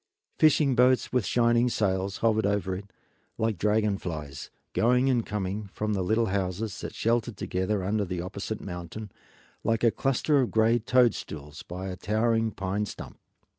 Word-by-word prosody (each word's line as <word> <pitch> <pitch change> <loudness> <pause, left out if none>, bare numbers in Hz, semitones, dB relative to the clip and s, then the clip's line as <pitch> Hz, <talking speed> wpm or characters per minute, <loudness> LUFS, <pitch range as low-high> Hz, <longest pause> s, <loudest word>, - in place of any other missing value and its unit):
Fishing 150 -3 +5
boats 125 +1 +3
with 125 -7 +1
shining 120 0 +3
sails 95 -3 0
hovered 110 -2 +2
over 100 -2 0
it, 100 +1 -9 0.5
like 110 -5 0
dragon 105 0 +2
flies, 75 -5 -6 0.2
going 125 +3 +3
and 120 -3 0
coming 105 0 -3
from 105 0 -1
the 95 - 0
little 110 +5 +2
houses 100 +1 -2
that - - -6
sheltered 115 -1 0
together 95 +2 -1
under 105 +2 0
the 90 -2 -4
opposite 100 +4 -5
mountain, 90 +3 -7 0.5
like 115 0 0
a 115 - +5
cluster 135 +5 +2
of 125 - 0
gray 115 +2 +3
toadstools 100 - 0
by 90 +2 -6
a 95 - -4
towering 115 +3 +1
pine 100 +1 -2
stump. - - -9
105 Hz, 160 wpm, -27 LUFS, 95-115 Hz, 0.5 s, Fishing